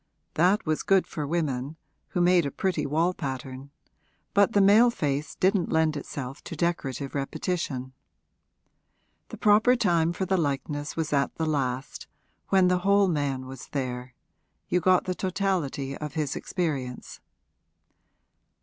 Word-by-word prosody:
That 185 +6 +3
was 155 -1 0
good 195 -1 +3
for 150 -2 -5
women, 145 -3 -2 0.3
who 180 - -1
made 175 -3 +4
a - - -4
pretty 165 -5 -1
wall 165 +5 +1
pattern; 135 -2 -6 0.6
but 200 +3 +4
the 205 - +4
male 210 +5 +6
face 145 -8 -2
didn't 190 -1 +1
lend 160 -1 +2
itself 135 -2 -6
to - - -6
decorative 150 -5 -2
repetition. 135 -2 -3 1.4
The - - -8
proper 215 +4 +5
time 170 -8 +2
for 190 +2 -2
the 190 +1 +1
likeness 145 -1 -2
was 160 -2 -2
at 140 -1 +1
the 160 - -1
last, 135 -3 -2 0.4
when 190 -2 +4
the 180 0 +2
whole 200 +1 +3
man 140 -5 -1
was 130 -1 -9
there 125 -2 -4 0.5
you 180 - +2
got 185 +1 +3
the 185 - -2
totality 180 -8 -2
of 150 -1 -6
his 150 -3 -1
experience. 140 -9 -4
155 Hz, 140 wpm, -27 LUFS, 140-185 Hz, 1.4 s, male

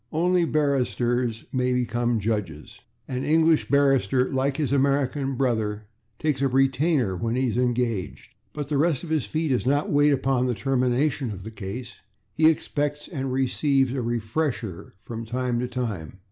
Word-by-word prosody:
Only 175 +2 +2
barristers 125 -6 0
may 125 -1 +1
become 120 -1 0
judges. 100 -8 -3 0.3
An 130 0 -3
English 160 0 +3
barrister, 135 -3 +2
like 135 +1 0
his 150 -4 -1
American 140 0 +1
brother, 110 -5 -1 0.3
takes 145 -2 -1
a - - +3
/retainer/ 135 - +2
when 115 0 -1
he 130 0 +1
is 110 - -3
engaged. 120 -5 -1 0.2
But 145 -2 -5
the 145 -2 +1
rest 155 -3 +1
of 165 - -7
his 155 -4 0
fee 160 0 -1
does 125 -1 0
not 145 +2 +1
wait 145 0 +4
upon 130 -2 +1
the 125 - 0
termination 130 +3 0
of 95 -3 -7
the 110 - -7
case: 110 +4 -7 0.4
he 160 0 +5
expects 145 -2 -2
and 135 -5 -3
receives 135 0 +1
a 135 - -3
/refresher/ 120 - -3
from 115 +3 -7
time 120 +1 -2
to 125 - -1
time. 110 -9 -4
130 Hz, 160 wpm, -25 LUFS, 120-145 Hz, 0.4 s, he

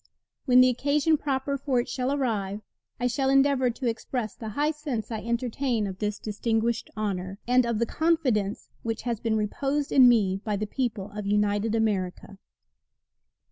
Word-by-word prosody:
When 250 0 +7
the 255 - +6
occasion 285 +5 +2
proper 280 -1 -2
for 265 -2 +1
it 240 - -2
shall 255 0 -2
arrive, 215 -8 -1 0.4
I 245 - -1
shall 265 +2 +1
endeavor 270 -1 +4
to 245 +3 -5
express 230 -1 -3
the 220 - -7
high 295 +8 0
sense 280 -8 -4
I 220 - -2
entertain 235 0 -1
of 190 -1 -6
this 210 -1 -2
distinguished 225 +2 -1
honor, 195 -2 -3
and 250 0 +4
of 235 -2 0
the 235 - +1
confidence 255 -10 0
which 225 -1 -3
has 235 -3 -2
been 220 -1 0
reposed 275 +7 -1
in 255 -2 +7
me 195 -5 +2
by 210 -2 -1
the 210 +2 -2
people 215 -4 -3
of 210 -1 -5
united 210 +1 +1
America. 200 -3 -2
235 Hz, 170 wpm, -26 LUFS, 210-265 Hz, 0.4 s, When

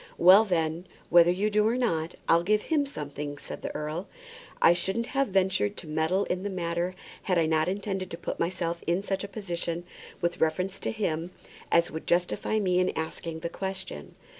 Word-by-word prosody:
"Well, 190 +5 +8
then, 165 -2 -1 0.2
whether 175 0 +7
you 200 +4 +1
do 210 +1 +3
or 235 +2 +1
not, 170 -9 0
I'll 165 +1 +5
give 210 +4 +2
him 295 -3 +1
something," 145 - -5
said - - -7
the - - -5
earl. 155 +5 -3 0.5
"I 170 - +7
shouldn't 190 +6 -1
have 275 +2 0
ventured 190 - +1
to - - -8
meddle 160 +5 +1
in 180 - -2
the 205 - -3
matter 175 -1 -2 0.3
had 180 -2 +1
I 165 - +4
not 155 0 +2
intended 195 -1 -2
to 165 - -6
put - - -5
myself 170 -1 -1
in 175 +3 +1
such 195 -1 -2
a - - -4
position 175 -4 -3 0.4
with 175 0 -1
reference 185 +5 0
to - - -2
him 175 -6 -2 0.4
as 170 0 +4
would 160 - -6
justify 180 +5 +1
me 180 -3 +2
in 185 0 +2
asking 160 0 -4
the 170 - -2
question." 190 +1 -5
180 Hz, 190 wpm, -28 LUFS, 165-195 Hz, 0.5 s, Well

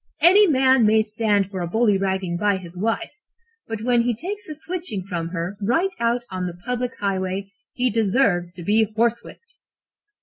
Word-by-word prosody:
Any 395 +5 +7
man 265 -4 +4
may 220 0 +4
stand 210 -2 0
for 190 -2 -4
a 175 - -2
bullyragging 190 -3 +1
by 205 -2 +2
his 175 -2 -10
wife, 225 - -2 0.6
but 225 -1 -5
when 240 0 +3
he 235 0 0
takes 400 - -6
a 305 - -5
switching 330 - -4
from 170 -4 -3
her 175 +3 -4
right 330 - +1
out 235 +1 0
on 185 -1 -3
the 175 -1 -7
public 250 0 -3
highway, 195 0 -2 0.2
he 250 0 0
deserves 200 -5 +1
to 175 -1 -9
be 215 +5 +3
horsewhipped.' 235 - -2
215 Hz, 170 wpm, -22 LUFS, 190-250 Hz, 0.6 s, Any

